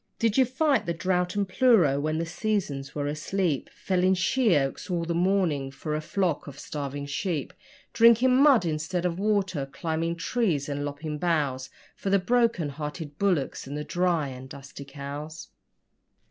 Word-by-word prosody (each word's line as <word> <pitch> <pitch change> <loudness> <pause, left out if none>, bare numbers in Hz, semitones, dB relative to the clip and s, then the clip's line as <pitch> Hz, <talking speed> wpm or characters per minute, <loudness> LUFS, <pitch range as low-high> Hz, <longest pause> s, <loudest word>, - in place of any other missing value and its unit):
Did 225 -2 +1
you 265 - +5
fight 265 - +1
the 170 - -1
drought 180 +2 0
and 200 -1 0
pleuro 185 - +4
when 155 +2 -1
the 165 - -1
'seasons' 165 -7 -2
were 145 -1 -2
asleep, 155 +1 -1
Felling 185 0 +1
sheoaks 180 - +1
all 170 -2 -1
the 170 - -1
morning 170 -6 +1
for 140 +3 -5
a 155 - -1
flock 175 0 -1
of 145 - -9
starving 145 -1 -5
sheep, 150 +1 -3 0.4
Drinking 235 +2 +6
mud 270 -7 +5
instead 160 +3 -2
of 175 0 -1
water 195 -8 0
climbing 160 +4 -2
trees 165 - 0
and 145 0 -3
lopping 150 +1 -5
boughs 145 -6 0 0.3
For 195 - -4
the 200 - +5
broken 230 -5 +1
hearted 150 +1 -6
bullocks 175 -10 0
and 145 +2 -5
the 150 - -3
dry 175 -4 0
and 130 0 -9
dusty 140 +1 -10
cows? 145 - -7
165 Hz, 160 wpm, -27 LUFS, 145-195 Hz, 0.4 s, Drinking